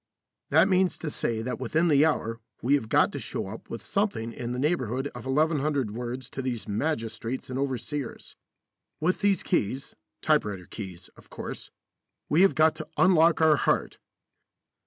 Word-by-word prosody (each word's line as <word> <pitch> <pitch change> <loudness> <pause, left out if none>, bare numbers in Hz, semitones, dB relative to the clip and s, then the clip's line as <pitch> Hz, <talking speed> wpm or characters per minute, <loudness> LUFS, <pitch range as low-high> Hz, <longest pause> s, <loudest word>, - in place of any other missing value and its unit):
That - - +5
means 185 -1 +2
to 155 - -4
say 115 -4 -1
that 125 +1 -3
within 155 +7 +1
the 150 0 +5
hour 115 -7 -1 0.2
we 130 +4 +3
have 135 -7 +1
got - - +4
to - - -5
show - - -4
up 110 - -9 0.2
something 120 - -1
in 120 0 -5
the 125 - -3
neighbourhood 135 -3 0
of - - -9
1100 145 -4 +1
words 120 +2 -5
to 135 - -4
these 125 -4 -3
magistrates 115 +1 -3
and 130 - -2
overseers. 135 0 -4 0.6
With 180 +4 0
these 200 -2 +2
keys 130 - -1 0.3
typewriter 100 -4 +1
keys, 95 -5 -8
of - - -20
course - - -7 0.6
we 155 +4 +4
have 195 - +5
got 155 0 +5
to 155 - -6
unlock 170 -3 +5
our 155 -2 +6
heart. - - 0
135 Hz, 160 wpm, -27 LUFS, 115-160 Hz, 0.6 s, our